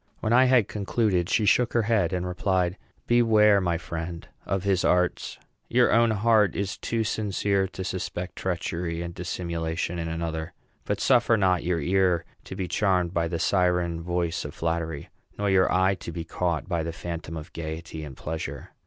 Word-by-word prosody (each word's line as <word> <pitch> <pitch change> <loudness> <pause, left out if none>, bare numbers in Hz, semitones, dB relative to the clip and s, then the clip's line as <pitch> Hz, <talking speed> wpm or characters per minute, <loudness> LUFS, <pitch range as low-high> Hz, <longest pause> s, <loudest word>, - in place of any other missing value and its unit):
When 110 - 0
I 130 +2 +6
had 125 -5 +4
concluded, 100 -3 0
she 110 - +2
shook 120 +3 +3
her 115 - +3
head, 110 -1 +2
and 90 -1 -2
replied, 90 0 0 0.3
"Beware, 110 -4 +5
my 85 -2 0
friend, 85 0 -6 0.2
of 95 -1 -1
his 95 -2 +1
arts. 90 0 +1 0.3
Your - - +4
own 115 +1 +5
heart 110 -1 +3
is 100 0 -2
too 115 -1 -2
sincere 100 -2 0
to 95 0 -7
suspect 90 -1 -4
treachery 85 -2 -2
and 85 0 -6
dissimulation 85 -1 -3
in 80 - -3
another; 80 -1 -4 0.3
but - - -1
suffer 120 -3 +4
not 95 -3 +2
your 85 -1 0
ear 90 0 +2 0.2
to - - -7
be 95 - -3
charmed 90 -3 +1
by 85 -1 +1
the 85 0 -2
siren 90 -1 +1
voice 85 -1 -1
of 75 - -7
flattery, 80 -2 -3 0.3
nor 100 -1 0
your 95 -1 +4
eye 95 +1 +3
to 90 -2 -7
be 85 0 -5
caught 85 -1 -2
by 85 -4 -1
the 85 +1 -3
phantom 85 -1 -6
of 80 +3 -9
gayety 80 0 -6
and 70 -4 -9
pleasure. 80 +1 -5
90 Hz, 180 wpm, -26 LUFS, 85-100 Hz, 0.3 s, I